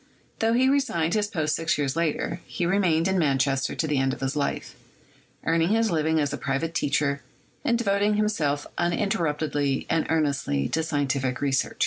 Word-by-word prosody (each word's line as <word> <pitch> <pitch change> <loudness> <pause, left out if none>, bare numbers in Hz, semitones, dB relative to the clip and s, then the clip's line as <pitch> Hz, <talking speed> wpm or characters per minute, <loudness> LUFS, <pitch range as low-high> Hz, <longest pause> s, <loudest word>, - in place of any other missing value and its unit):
Tho 225 +1 +2
he 255 +2 +4
resigned 175 - +1
this 210 -1 +1
post 155 -6 -1
six 165 -1 0
years 140 -1 -1
later, 165 +1 -1
he 175 - -2
remained 175 -3 +2
in 190 -1 +1
Manchester 135 -3 +1
to - - -1
the 150 -3 0
end 135 0 +1
of - - -7
his 135 +2 -2
life, 145 -1 -2 0.7
earning 165 +1 +2
his 225 +1 +2
living 160 -1 +1
as 145 -2 0
a - - -4
private 140 +5 -2
teacher, 140 -2 0 0.4
and 235 - +2
devoting 205 -2 +1
himself 155 -10 0
uninterruptedly 155 -6 0
and 165 -1 +1
earnestly 140 - 0
to 160 - 0
scientific 140 -5 -1
research. 135 -2 0
160 Hz, 170 wpm, -25 LUFS, 140-180 Hz, 0.7 s, he